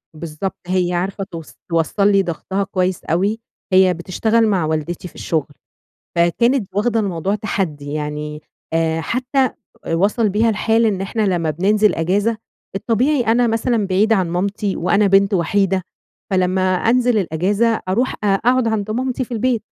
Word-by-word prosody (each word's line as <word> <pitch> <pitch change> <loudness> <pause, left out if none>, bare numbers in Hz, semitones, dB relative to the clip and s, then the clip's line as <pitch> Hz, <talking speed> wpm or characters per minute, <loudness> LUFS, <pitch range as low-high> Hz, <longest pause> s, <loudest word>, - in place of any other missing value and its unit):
بالضبط، 165 +4 -5
هي 180 -1 0
عارفة 190 +3 -2
توص 165 -4 -9 0.2
توصّل 170 +5 +1
لي 195 -1 +4
ضغطها 190 +3 -3
كويس 185 -2 -1
أوي، 195 +7 0 0.3
هي 185 -1 +5
بتشتغل 220 +6 +1
مع 185 -6 +1
والدتي 160 +3 -3
في - - -16
الشُّغل 155 -4 -1 0.7
فكانت 220 +7 +2
واخدة 225 +3 +1
الموضوع 195 -1 -1
تحدي، 160 -9 -3
يعني 150 0 -4 0.3
آآ 165 0 +1
حتّى 255 - 0 0.4
وصل 210 +5 +2
بيها 220 +4 +2
الحال 225 +2 +2
إن 200 -4 0
إحنا 200 +3 -2
لما 175 -6 +1
بننزِل 205 +6 +2
إجازة، 200 +7 0 0.4
الطبيعي 250 +7 +1
أنا 235 +1 +3
مثلًا 225 -2 0
بعيدة 210 +4 +3
عن 185 -4 0
مامتي 195 +3 -1
وأنا 200 +4 +2
بنت 195 +1 +4
وحيدة 190 +1 +1 0.5
فلمّا 185 0 +1
أنزل 240 +4 +2
الإجازة 200 +6 +1
أرُوح 235 +7 +1
أ - - +1
أقعد 230 +5 +2
عند 215 -1 -1
مامتي 255 +2 -1
في 245 - -12
البيت، 235 0 0
195 Hz, 150 wpm, -19 LUFS, 175-225 Hz, 0.7 s, هي